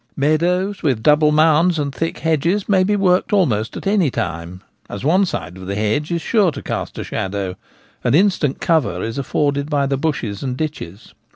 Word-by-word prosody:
Meadows 175 +7 +1
with 130 -8 0
double 150 +2 +4
mounds 160 +3 +4
and 140 -2 -2
thick 165 +4 -3
hedges 165 +5 0
may 190 -3 +3
be 205 +2 +1
worked 185 -2 +2
almost 120 - +1
at - - -8
any 195 -6 +2
time, 85 -3 -4 0.3
as 100 - -6
one 185 +6 +3
side 85 - -5
of 95 0 -9
the 100 - -3
hedge 110 - -1
is 170 -1 -1
sure 205 -6 +2
to - - -8
cast - - -4
a - - -3
shadow, 95 -1 -3 0.5
and - - +2
instant 175 -6 +2
cover 140 - +1
is 115 +4 -4
afforded 140 +1 -1
by 145 -2 +1
the 135 0 -1
bushes 130 -9 -2
and 130 -2 -3
ditches. 125 - -6
150 Hz, 190 wpm, -19 LUFS, 110-175 Hz, 0.5 s, double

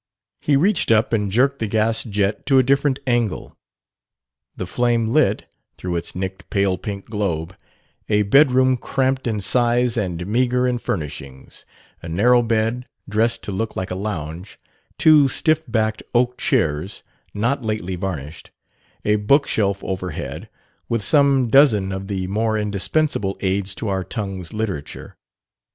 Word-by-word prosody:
He 145 - +1
reached 185 +5 +2
up 110 +2 +3
and 105 -3 0
jerked 135 +6 +2
the 110 - -1
gas 110 +2 +1
jet 105 -1 -2
to 135 - +4
a 130 - +6
different 140 +1 +2
angle. 120 -5 -1 1.0
The 95 - -3
flame 120 +2 0
lit, 155 +4 +2 0.3
through 90 -1 -4
its 85 - -4
nicked, 95 +1 -5
pale 100 -2 +1
pink 100 +1 -6
globe, 95 -5 -3 0.5
a 105 -1 +3
bedroom 130 +2 +4
cramped 130 +1 -1
in 110 -2 -1
size 120 +2 +2
and 90 -5 -2
meagre 125 +4 +1
in 125 -1 -1
furnishings: 75 - -6 0.4
a 85 - -8
narrow 120 +9 +4
bed, 115 +2 -1 0.2
dressed 115 +2 0
to - - -4
look 110 +4 -3
like 95 - -4
a - - -2
lounge; 90 -2 -5 0.4
two 155 -3 +6
stiff 155 +4 +1
backed 110 -2 -1
oak 125 +1 +2
chairs, 80 +6 -1 0.3
not 120 +6 0
lately 105 -4 -3
varnished; 80 -5 -6 0.6
a 105 0 +3
bookshelf 105 -4 +1
overhead, 95 -1 -5 0.4
with 115 -3 -1
some 140 0 +3
dozen 110 -7 +4
of 95 0 -5
the 95 -2 -3
more 110 +3 0
indispensable 105 +1 0
aids 95 0 0
to 110 - -5
our 95 -1 -1
tongue's 95 -5 -5
literature. 100 -10 -5
110 Hz, 145 wpm, -21 LUFS, 95-125 Hz, 1.0 s, a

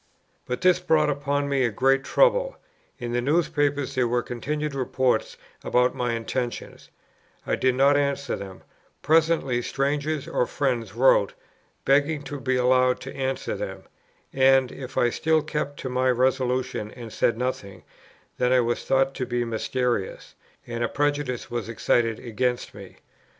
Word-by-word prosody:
But 125 - -3
this 185 -1 +4
brought 155 -4 +2
upon 145 0 -1
me 140 -2 +1
a 120 - +2
great 135 +5 +2
trouble. - - +2 0.4
In 120 -2 -5
the 120 - +1
newspapers 145 -1 0
there 130 -2 +1
were 120 0 0
continual 150 +3 -3
reports 125 -2 0 0.3
about 125 0 +2
my 120 -1 -1
intentions; 120 +1 -4 0.6
I - - 0
did 130 -1 +1
not 140 +2 +4
answer 140 -1 0
them; 95 -2 -9 0.4
presently 155 -5 +2
strangers 145 +3 -1
or 125 - 0
friends 120 -7 -2
wrote, 130 +3 +4 0.5
begging 145 +2 +2
to 145 -1 -6
be 130 -1 0
allowed 125 0 +3
to 135 - -8
answer 135 -1 -2
them; - - -6 0.5
and, 135 -1 +4
if 135 -1 -9
I 120 - +3
still 160 +3 +1
kept 150 -2 -3
to - - -4
my 130 +1 +1
resolution 125 -3 0
and 115 -1 -10
said 115 - +1
nothing, 105 -6 -4 0.6
then 125 0 +2
I 130 - +5
was 120 0 -1
thought 135 0 +2
to 125 - -4
be 120 0 -1
mysterious, 115 -2 -2 0.3
and 120 0 -3
a 120 - 0
prejudice 145 -4 -1
was 120 -2 -3
excited 115 0 +1
against 125 +1 -2
me. 100 -2 -12
130 Hz, 155 wpm, -25 LUFS, 120-145 Hz, 0.6 s, I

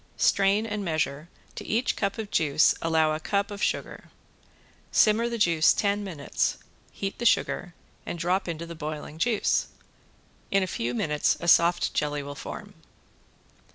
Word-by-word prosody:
Strain 200 +2 +3
and 210 -2 -3
measure, 155 -2 -2 0.2
to - - -7
each 230 +4 0
cup 200 -1 -2
of 220 -2 -6
juice 150 -1 +3
allow 160 -1 +2
a 155 - -3
cup 200 +5 -1
of 205 0 -7
sugar. - - -2 0.8
Simmer 225 +2 +4
the 235 - -3
juice 165 -6 +4
ten 205 0 0
minutes, 160 -8 -2 0.3
heat 195 0 -5
the - - -4
sugar 180 -4 0 0.3
and - - -5
drop 180 +3 0
into 170 0 -4
the 170 - -8
boiling 155 -1 -6
juice. 225 +1 +1 0.8
In 195 -1 +2
a - - +1
few 120 -8 -3
minutes 150 +4 +1
a 170 - -5
soft 170 +1 +4
jelly 145 -1 -1
will 145 0 -7
form. - - -8
170 Hz, 155 wpm, -26 LUFS, 155-200 Hz, 0.8 s, Simmer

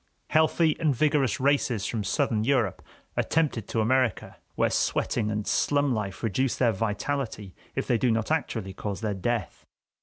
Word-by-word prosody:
Healthy 160 0 +3
and 155 -5 +2
vigorous 140 -4 +2
races 130 -6 +1
from 110 +1 -2
Southern 105 +2 0
Europe 120 -6 +1 0.3
are - - +2
tempted 145 -10 0
to 115 - 0
America, 125 0 +1 0.2
where - - +2
sweating 105 - 0
and 105 -1 -2
slum 145 -2 +2
life 100 -6 -4
reduce 120 +4 0
their 120 -3 +3
vitality 110 -1 -3 0.2
if - - -1
they 120 - +1
do 125 - +2
not 115 +3 0
actually 115 -11 -1
cause 100 +1 -5
their 110 -2 -1
death. 105 +2 -3
115 Hz, 160 wpm, -27 LUFS, 105-140 Hz, 0.3 s, Healthy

